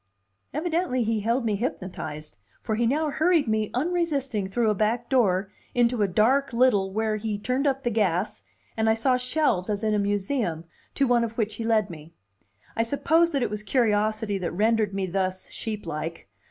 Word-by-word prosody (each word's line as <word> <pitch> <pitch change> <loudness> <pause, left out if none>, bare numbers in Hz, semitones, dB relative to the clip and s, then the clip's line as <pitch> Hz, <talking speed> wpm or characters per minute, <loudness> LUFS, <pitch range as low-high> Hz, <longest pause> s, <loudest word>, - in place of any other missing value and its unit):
Evidently 315 -5 0
he 225 0 0
held 230 +4 0
me 215 -2 +1
hypnotized, 160 -9 -5 0.2
for 220 - -3
he 230 +2 +1
now 300 +4 +1
hurried 320 -2 +2
me 215 -1 0
unresisting 275 - -1
through 225 +1 +1
a - - +2
back 220 +4 0
door 200 -6 +2 0.2
into 240 -1 +2
a 205 - +3
dark 245 +8 +2
little 225 -6 +3
where 215 +1 0
he 215 -1 -3
turned 255 +7 -1
up 270 0 0
the 240 - 0
gas, 200 -3 0 0.3
and 220 0 +1
I 220 - +4
saw 255 +3 +2
shelves 250 - 0
as 210 0 -2
in 215 -1 +1
a 210 - +2
museum, 200 - -1 0.3
to 275 - +3
one 245 -2 +3
of 230 0 -4
which 220 -2 0
he 230 - -3
led 220 -4 +1
me. 160 0 -12 0.6
I - - +1
suppose 315 +8 +2
that 280 -6 0
it - - -2
was 210 0 -3
curiosity 215 -2 +1
that 180 - -2
rendered 215 +2 +2
me 195 -1 -2
thus 185 0 -2
sheep 215 -3 -5
like. 165 -4 -5
220 Hz, 190 wpm, -26 LUFS, 200-255 Hz, 0.6 s, I